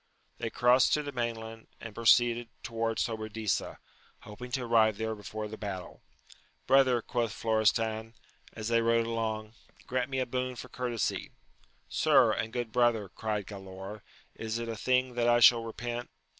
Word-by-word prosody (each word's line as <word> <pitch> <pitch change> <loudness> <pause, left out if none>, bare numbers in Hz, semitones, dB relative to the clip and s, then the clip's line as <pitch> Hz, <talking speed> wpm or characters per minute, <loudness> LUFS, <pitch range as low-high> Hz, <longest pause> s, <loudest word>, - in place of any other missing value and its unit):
They 115 - -2
crossed 125 +2 +4
to 150 - -1
the 145 - -5
main 120 -3 -1
land, 110 0 -10
and 115 -2 -8
proceeded 120 +1 +3
towards 115 -1 -1
Sobradisa, 110 -3 -2 0.4
hoping 110 +4 -9
to 130 - 0
arrive 110 -3 +3
there 110 0 -2
before 105 0 -6
the 110 +1 -9
battle. 95 -4 -6 0.6
Brother, 130 -3 +4
quoth 120 -3 -1
Flo 110 0 0
restan, 110 +1 +1 0.4
as 110 0 -4
they 115 0 +3
rode 115 0 +2
along, 110 -1 -3 0.3
grant 130 +1 -1
me 135 - -2
a 130 - +1
boon 125 +1 -3
for 125 - -9
cour 125 -1 -3
tesy. 115 -4 -2 0.6
Sir, - - +4
and 110 - -2
good 120 -2 -3
brother, 115 -4 +2
cried 105 0 -3
Galaor, 95 +1 -8 0.3
is 110 0 -4
it 115 0 -4
a 115 - -3
thing 130 +3 +1
that 120 0 +1
I 120 0 +5
shall 120 -1 +7
repent 120 +1 -5
115 Hz, 170 wpm, -30 LUFS, 110-120 Hz, 0.6 s, shall